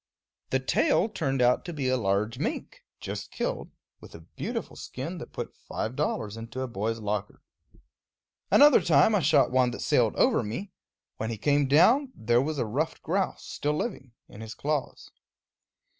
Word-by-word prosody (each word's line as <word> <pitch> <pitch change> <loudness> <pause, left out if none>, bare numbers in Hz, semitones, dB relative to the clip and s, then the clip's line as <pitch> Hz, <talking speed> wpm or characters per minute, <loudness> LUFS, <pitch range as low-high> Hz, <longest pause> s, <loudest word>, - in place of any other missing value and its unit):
The - - +1
tail 280 -7 +2
turned 135 - -1
out 125 +1 +3
to 175 - -5
be 140 -4 -2
a 130 - +2
large 105 -1 0
mink, - - -4 0.2
just - - -6
killed, - - -3 0.3
with - - -13
a 80 - -11
beautiful 80 - -6
skin - - -6
that - - -9
put - - -6
five 110 +4 -5
dollars 110 -3 -2
into 115 +3 -6
a 130 - -2
boy's 115 0 -2
locker. 105 -2 -4 1.1
Another 290 -6 +7
time 160 +5 +4
I 205 - +4
shot 145 -5 +3
one 130 -1 +3
that - - -6
sailed - - +2
over - - +3
me; 180 - -5 0.5
when 110 - -3
he 115 - -4
came 145 +4 +2
down, 230 - +4
there 120 +2 +2
was 155 +2 -2
a 125 - 0
ruffed 140 +9 -2
grouse, 190 +4 -1
still 150 +1 -2
living, 135 - -4
in 105 - -12
his 110 0 -8
claws. 150 -2 -3
130 Hz, 175 wpm, -27 LUFS, 115-155 Hz, 1.1 s, Another